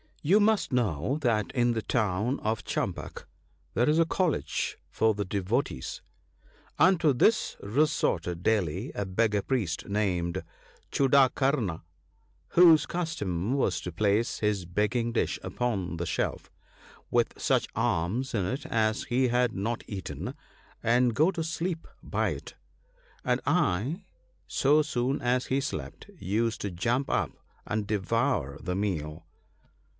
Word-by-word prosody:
* - - -33
You 205 - +7
must 215 -4 +2
know 110 - 0
that 110 -6 +1
in 120 -2 +2
the 110 - -1
town 110 +3 0
of 110 +1 -2
Champaka - - -4 0.5
there 120 +5 +3
is 155 +2 +3
a 165 - +5
college 175 -1 -1
for 110 0 +2
the 100 0 -3
devotees. 100 - -2 0.8
Unto 170 -5 +5
this 215 - +2
resorted 100 - 0
daily 100 -9 0
a 100 - -2
beggar 105 +2 +1
priest, 110 -11 -1
named 90 -5 -1 0.5
Chudakarna, 135 - +3 0.7
whose 165 -4 +7
custom 115 - -2
was 95 - +1
to 90 - -5
place 105 +5 +1
his 105 -4 0
begging 105 +6 0
dish 115 - 0
upon 100 -9 -2
the 85 - -2
shelf, - - -2 0.6
with - - +2
such - - +2
alms 105 +12 0
in 100 -5 0
it 130 +9 -3
as 110 +3 +1
he 130 +1 +2
had 120 -1 +2
not 115 +5 -2
eaten, 95 -3 -5 0.5
and 120 0 +3
go 155 - +4
to 170 -4 -3
sleep 165 +1 -3 0.2
by - - 0
it; - - -7 0.7
and 125 0 +1
I, 145 - +1 0.4
so 145 +3 +3
soon 135 -2 -1
as 125 +1 +1
he 135 - +1
slept, 140 - -6
used 110 +4 -1
to 100 - -3
jump 120 +10 0
up, - - 0 0.4
and 105 -1 -2
devour 95 -9 0
the 90 - -2
meal. 80 -5 -3
115 Hz, 135 wpm, -28 LUFS, 95-135 Hz, 0.8 s, You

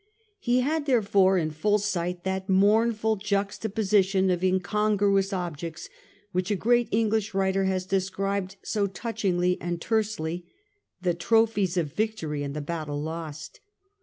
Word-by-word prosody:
He 245 +1 +2
had 300 +3 -1
therefore 200 -6 +3
in 155 -3 0
full 205 +7 +1
sight 180 -4 -2
that 190 +1 -3
mournful 215 +3 +3
juxtaposition 200 -1 +1
of 180 0 -1
incongruous 195 +1 +2
objects 170 -3 -5 0.4
which 185 +2 -1
a 205 - +2
great 240 +4 +2
English 220 -1 0
writer 195 0 +1
has 185 -1 0
described 195 0 -1
so 205 -2 0
touchingly 180 -3 -1
and 175 -1 -3
tersely 180 -5 -2 0.3
— 415 - -50
the 180 -1 +2
tropHes 205 0 +2
of 155 -5 -1
victory 205 -9 -2
and 140 0 -4
the 150 - -3
battle 150 -1 -4
lost. 155 0 -6
195 Hz, 135 wpm, -26 LUFS, 175-215 Hz, 0.4 s, therefore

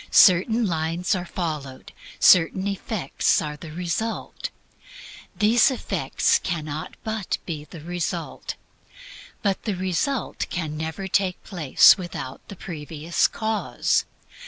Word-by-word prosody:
Certain 220 +5 +6
lines 165 +1 0
are 180 -2 -2
followed; 150 -8 -5 0.3
certain 180 +2 +5
effects 200 -5 0
are 150 -1 -4
the 155 +1 -10
result. 180 +7 -3 0.9
These 225 +4 +5
effects 260 - +1
cannot 155 -3 -4
but 220 -3 -2
be 155 -4 -5
the 165 0 -11
result. 175 +1 -4 0.9
But 200 -2 +1
the 210 -4 -1
result 190 +8 -1
can 160 -4 -3
never 160 +5 -4
take 190 -1 0
place 170 -2 +5
without 160 -7 -6
the 200 - -9
previous 160 -1 -1
cause. 220 -1 0
175 Hz, 110 wpm, -24 LUFS, 160-200 Hz, 0.9 s, Certain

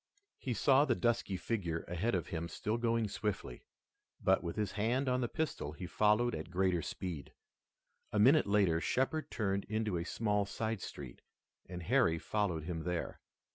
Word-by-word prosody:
He 125 -3 -2
saw 135 +5 +5
the 130 -5 +2
dusky 115 -5 0
figure 90 -5 -2
ahead 90 +6 0
of 85 - -2
him 85 0 -3
still 110 +2 -2
going 115 -1 +1
swiftly, 100 - -3 0.6
but 95 0 +3
with 85 - -3
his 105 -3 -1
hand 120 +6 0
on 125 0 +2
the 120 - +1
pistol 155 - -2
he 90 +4 -7
followed 105 +5 +3
at - - -5
greater 90 -1 +1
speed. 80 -4 -5 0.8
A - - -1
minute 135 +8 +6
later 100 -5 +3
Shepard 145 - 0
turned 100 -3 -1
into 110 -3 -1
a 85 - -2
small 105 +1 0
side 110 -1 -2
street, 65 -7 -8 0.5
and 90 -2 -6
Harry 115 -6 +3
followed 90 -4 -1
him 80 0 -3
there. 90 +1 -3
105 Hz, 170 wpm, -34 LUFS, 90-115 Hz, 0.8 s, minute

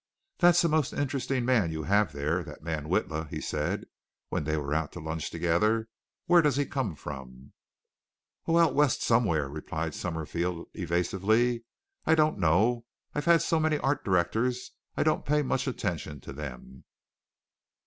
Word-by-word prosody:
"That's 175 -1 +6
a - - +4
most 155 -3 +1
interesting 135 -2 -1
man 115 -10 +2
you 80 -1 -4
have 100 -1 +2
there, 75 +5 -1
that - - -11
man 80 -2 -3
Witla," 80 -3 -1
he - - -4
said, - - -2 0.4
when - - -2
they 75 +1 0
were 75 -1 -2
out 80 -1 -1
to - - -7
lunch 80 -1 -4
together. 105 +7 +1 0.4
"Where 175 0 +6
does 150 -4 +2
he 145 0 +1
come 130 - -2
from?" 65 -3 -9 0.9
"Oh, 165 0 +4
the 165 - +6
West 145 -3 +2
somewhere!" 90 - +2
replied 80 +2 -4
Summerfield 85 +1 -3
evasively. 100 +7 +1 0.4
"I 160 - +4
don't 155 -7 +2
know. 110 +8 +2 0.3
I've 145 - -2
had 170 -1 +5
so 165 - +1
many 155 -1 +2
art 145 +1 0
directors 110 +7 0 0.3
I - - +3
don't - - +1
pay 150 +1 +2
much 130 - -1
attention 75 -1 -3
to - - -9
them." 65 -2 -8
95 Hz, 160 wpm, -28 LUFS, -, 0.9 s, That's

